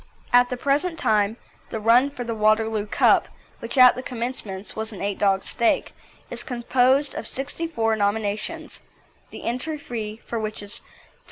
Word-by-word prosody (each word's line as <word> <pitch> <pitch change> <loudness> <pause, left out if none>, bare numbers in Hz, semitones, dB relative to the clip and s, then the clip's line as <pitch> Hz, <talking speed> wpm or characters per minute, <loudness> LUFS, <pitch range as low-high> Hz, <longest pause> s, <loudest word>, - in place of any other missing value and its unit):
At 245 0 +6
the 250 - -3
present 295 +6 0
time 215 -3 +1 0.3
the 220 - -4
run 235 +5 +5
for 250 -3 -6
the 230 -1 -3
Waterloo 215 0 +1
Cup, - - +4 0.3
which 235 +4 -5
at 255 -1 +9
the 255 - -6
commencement 235 -6 -5
was 220 0 -4
an 205 - -9
eight 200 0 -3
dog 195 -1 +2
stake, 235 -2 0 0.4
is - - -5
composed 255 +3 +2
of 220 - -6
sixty 285 +5 -3
four 225 -8 0
nominations, 215 +9 -2 0.5
the - - -10
entry 260 +7 -2
fee 225 -6 -6
for 230 - -3
which 215 -1 -4
is 205 +3 -7 0.3
P25. - - -32
230 Hz, 170 wpm, -24 LUFS, 215-255 Hz, 0.5 s, at